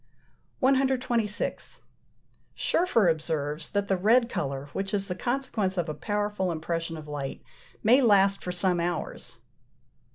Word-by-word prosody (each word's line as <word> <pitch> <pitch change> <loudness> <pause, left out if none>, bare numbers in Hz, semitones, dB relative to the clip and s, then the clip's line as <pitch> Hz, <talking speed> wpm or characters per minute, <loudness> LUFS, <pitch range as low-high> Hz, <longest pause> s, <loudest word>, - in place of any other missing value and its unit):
126. 255 -5 0 0.8
Scherfer 235 - +2
observes 155 -2 -1
that 200 0 -1
the 195 - +2
red 230 +6 +3
colour, 140 -5 -3
which 195 +2 -2
is 195 -1 -2
the 180 - -2
consequence 225 -4 -2
of 175 -1 0
a 155 - -3
powerful 205 +1 -1
impression 165 0 -3
of 155 -1 -9
light, 145 -2 -5 0.4
may 245 +6 +6
last 200 -4 +4
for 180 - -3
some 180 0 +1
hours. 170 -1 -4
195 Hz, 130 wpm, -27 LUFS, 165-225 Hz, 0.8 s, may